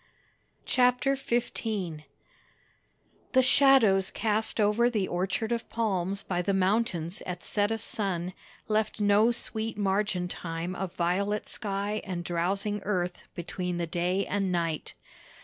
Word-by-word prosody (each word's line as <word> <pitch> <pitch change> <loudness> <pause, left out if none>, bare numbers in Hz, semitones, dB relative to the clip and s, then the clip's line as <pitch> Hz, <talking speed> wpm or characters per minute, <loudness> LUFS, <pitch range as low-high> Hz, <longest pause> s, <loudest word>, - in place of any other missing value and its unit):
CHAPTER 250 +2 +3
XV 240 -3 -1 1.7
The 260 -1 +6
shadows 255 -8 +5
cast 220 0 0
over 215 +3 +4
the 210 -6 0
Orchard 195 +6 -1
of 235 -1 -2
Palms 195 -4 -1
by 180 -1 -1
the 195 +2 0
mountains 190 -3 +1
at 180 -1 -5
set 205 -1 +1
of 225 -1 -2
sun 185 -5 -2 0.3
left 215 0 0
no 205 +2 +5
sweet 220 -2 -3
margin 195 -2 0
time 170 0 -4
of 185 -1 -4
violet 200 +4 0
sky 205 0 -2
and 180 -3 -4
drowsing 195 +4 -1
earth 180 -3 -2
between 180 +1 -3
the 170 - -1
day 180 +3 0
and 195 -2 -1
night. 165 -3 -2
200 Hz, 130 wpm, -28 LUFS, 180-220 Hz, 1.7 s, The